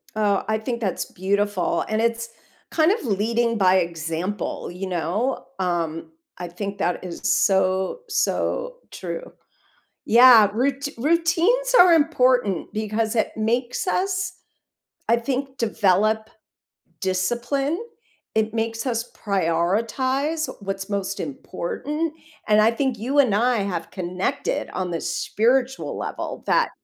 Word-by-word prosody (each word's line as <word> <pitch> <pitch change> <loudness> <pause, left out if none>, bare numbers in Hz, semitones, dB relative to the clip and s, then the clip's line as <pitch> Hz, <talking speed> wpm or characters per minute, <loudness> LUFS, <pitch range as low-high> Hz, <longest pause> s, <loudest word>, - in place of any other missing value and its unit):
Oh, 205 -2 +1
I 220 0 +1
think 235 +2 -4
that's 195 -4 -1
beautiful, 200 0 -1
and 215 +1 0
it's 230 0 0 0.4
kind 320 +2 +4
of 420 -6 -1
leading 230 +2 +1
by 185 -2 +4
example, 170 +3 -3
you 185 +2 -5
know, 185 +9 -1
um, 170 - -2 0.3
I 175 - -5
think 200 +3 -5
that 180 -2 -1
is 175 -2 -7
so, 190 - +2
so - - -1
true. - - -6 0.7
Yeah, 235 -2 +8
rout 275 +4 0
routines 335 - +2
are 360 -1 +8
important 255 - +2
because 215 +1 -1
it 220 - +1
makes 240 +7 -1
us, 370 -1 0 0.8
I 235 - +5
think, 265 +2 -3
develop 215 0 +1 0.7
discipline. 240 - -1 0.5
It 220 0 +1
makes 225 +1 -2
us 235 -2 -2
prioritize 225 - 0
what's 195 -1 -5
most 200 -1 -2
important, 295 - -4 0.4
and 210 0 +5
I 220 +2 +5
think 260 0 -1
you 265 +6 0
and 255 -7 +4
I 240 +4 +2
have 180 -4 -3
connected 190 - -2
on 185 -1 -3
the 165 - -2
spiritual 245 +9 0
level - - -5
that, - - +3
220 Hz, 125 wpm, -23 LUFS, 190-265 Hz, 0.8 s, Yeah